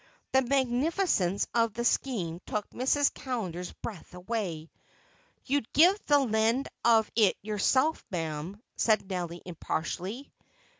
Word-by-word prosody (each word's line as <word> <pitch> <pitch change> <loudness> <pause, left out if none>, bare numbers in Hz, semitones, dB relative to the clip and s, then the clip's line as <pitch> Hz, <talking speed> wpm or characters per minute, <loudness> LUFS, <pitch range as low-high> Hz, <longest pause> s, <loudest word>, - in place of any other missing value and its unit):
The 265 - +5
magnificence 260 - +1
of 230 -2 +2
the 235 +1 -2
scheme 185 -11 0
took 210 -1 -2
Mrs. 275 +3 +2
Callender's 185 -9 -4
breath 185 -4 -9
away. 180 -5 -4 0.7
"You'd 275 -4 -1
give 365 +7 +5
the 290 - +6
lend 230 0 +1 0.2
of 225 -2 +4
it 215 -4 +4
yourself, 260 +9 +1
ma'am," 165 +2 -4 0.2
said 215 -3 +2
Nelly 175 -3 -4
impartially. 180 - -4
220 Hz, 115 wpm, -29 LUFS, 180-260 Hz, 0.7 s, the